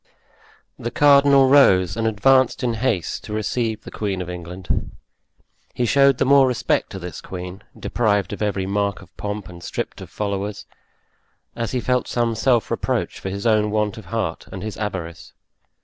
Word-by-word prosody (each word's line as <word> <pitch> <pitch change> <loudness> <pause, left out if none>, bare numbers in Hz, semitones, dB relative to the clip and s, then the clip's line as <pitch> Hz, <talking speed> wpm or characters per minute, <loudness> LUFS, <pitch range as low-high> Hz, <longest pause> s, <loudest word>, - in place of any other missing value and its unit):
The 120 - -3
cardinal 140 0 +5
rose, 95 -11 +5
and 115 0 0
advanced 130 +5 +3
in 120 -2 +1
haste 110 -7 -1
to 105 - -6
receive 110 +1 -2
the - - -10
queen 100 -3 -3
of 90 -1 -4
England. 90 +1 -4 0.9
He 125 - +1
showed 140 +2 +4
the - - +1
more 135 0 +6
respect 125 -2 0
to - - -5
this 90 -2 -7
queen, 90 +1 -7 0.2
deprived 105 -4 0
of 105 - -7
every 100 -2 0
mark 100 0 -1
of 95 +1 -20
pomp 105 -1 -5
and 85 -1 -11
stripped - - -5
of - - -9
followers, 100 0 -3 0.9
as 115 +1 -3
he 125 - +1
felt 125 +1 0
some 120 -1 0
self 120 0 +1
reproach - - -1
for 95 - -5
his 100 +2 -5
own 110 -2 +3
want 105 0 0
of 110 - -10
heart 110 -8 -3
and 95 - -7
his 110 -1 -5
avarice. 95 -6 -5
105 Hz, 175 wpm, -22 LUFS, 95-120 Hz, 0.9 s, more